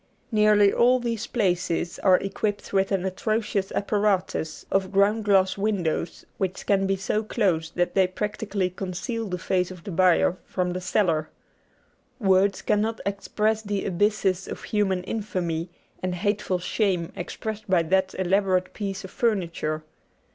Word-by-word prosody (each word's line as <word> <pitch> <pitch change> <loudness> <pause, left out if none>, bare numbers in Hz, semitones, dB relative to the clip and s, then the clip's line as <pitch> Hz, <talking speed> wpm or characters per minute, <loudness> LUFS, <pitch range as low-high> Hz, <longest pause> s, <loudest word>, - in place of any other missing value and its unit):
Nearly 210 -2 +5
all 250 +2 +4
these 230 -3 -3
places 180 -5 0
are 185 -1 +5
equipped 205 +2 -3
with 195 +1 +2
an 190 -1 0
atrocious 205 +1 -1
apparatus 200 -6 0
of 195 -1 +1
ground 205 +2 +3
glass 195 -1 +3
windows 180 -5 -1
which 185 -1 -2
can 195 -1 +2
be 195 - +2
so 195 +3 -1
closed 175 -7 0
that 175 0 +1
they 190 -2 +4
practically 200 -1 -2
conceal 195 +5 -4
the 180 - -2
face 180 +1 0
of 180 -2 -10
the 200 - -6
buyer 180 0 +3
from 180 -1 -1
the 185 - -4
seller. 170 -5 +1 0.9
Words 195 -2 +3
cannot 220 +2 +1
express 210 +2 0
the 205 -2 -3
abysses 195 0 +1
of - - -7
human 195 -4 0
infamy 180 -5 -3 0.3
and 185 -1 -2
hateful 205 0 0
shame 180 -2 -1
expressed 215 +4 -5
by 180 -3 +4
that 190 +3 +1
elaborate 185 0 +1
piece 195 -2 -4
of 190 - -9
furniture. 170 -8 -1
195 Hz, 145 wpm, -25 LUFS, 180-210 Hz, 0.9 s, Nearly